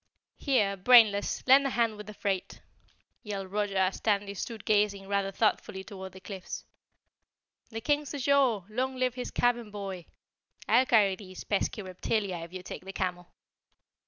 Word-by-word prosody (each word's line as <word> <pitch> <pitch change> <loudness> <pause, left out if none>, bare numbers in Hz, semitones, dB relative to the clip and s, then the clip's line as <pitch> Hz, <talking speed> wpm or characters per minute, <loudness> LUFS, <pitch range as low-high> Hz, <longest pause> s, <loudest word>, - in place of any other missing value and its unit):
"Here, 210 -9 +1
Brainless, 210 -1 +5
lend 275 +2 +6
a - - 0
hand 230 -3 +1
with 210 -1 -10
the 210 - -9
freight," 195 -2 -3 0.6
yelled 195 -3 -5
Roger 205 -1 -1
as 190 0 +1
Tandy 200 -2 0
stood 220 +2 -6
gazing 205 -2 +1
rather 200 -1 0
thoughtfully 195 -1 0
toward 190 -2 -9
the 190 - -11
cliffs. 190 -1 -7 1.0
"The 225 0 -6
King's 290 +2 0
ashore! 270 -8 +2
Long 260 +4 -1
live 255 -1 0
his 250 -1 -5
cabin 240 -2 +1
boy! 195 -4 -6 0.6
I'll 255 - +4
carry 205 -5 +4
these 185 -2 -10
pesky 205 +1 -1
reptilia 185 +1 -2
if 170 - -10
you 185 0 -7
take 180 - -8
the 190 - -7
camel." 180 -2 -3
205 Hz, 160 wpm, -29 LUFS, 190-235 Hz, 1.0 s, lend